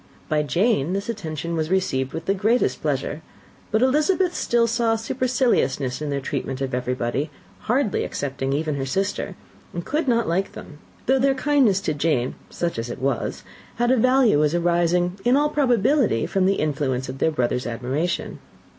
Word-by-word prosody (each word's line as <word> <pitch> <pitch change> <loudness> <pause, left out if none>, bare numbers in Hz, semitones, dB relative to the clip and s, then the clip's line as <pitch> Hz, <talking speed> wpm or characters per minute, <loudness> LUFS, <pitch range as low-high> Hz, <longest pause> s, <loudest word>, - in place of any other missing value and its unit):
By 155 -1 +2
Jane 175 - +1
this 200 +3 -3
attention 165 -6 -4
was 160 -1 -1
received 135 -9 0
with 165 0 -6
the 195 - +2
greatest 220 +5 +1
pleasure; 145 +1 -2 0.5
but 220 +3 +2
Elizabeth 310 +7 +2
still 235 -1 +2
saw 230 -1 +1
superciliousness 230 - 0
in 150 - -2
their 140 -1 -1
treatment 135 0 -4
of 135 -2 -3
everybody, 125 +3 -1 0.3
hardly 240 -2 0
excepting 135 -1 -3
even 155 +2 0
her 135 - -2
sister, 195 +4 -2 0.4
and 170 - -4
could 300 0 -1
not 235 -2 +2
like 185 +4 0
them; 150 -2 -11 0.3
though 265 +1 +3
their 270 +1 +3
kindness 265 -8 +3
to 155 - -1
Jane, 145 -4 0 0.2
such 170 -8 -2
as 115 +1 -4
it - - -5
was, 135 -2 -2 0.3
had 240 +1 +2
a - - +5
value, 250 - +4
as 150 +2 +1
arising, 175 +1 +1
in 245 +3 +4
all 295 +1 +2
probability, 260 - +2
from 190 -1 +1
the 195 - +3
influence 135 -5 -1
of 130 +1 -7
their - - +3
brother's 125 -4 -1
admiration. 130 +9 -2
175 Hz, 170 wpm, -23 LUFS, 140-235 Hz, 0.5 s, a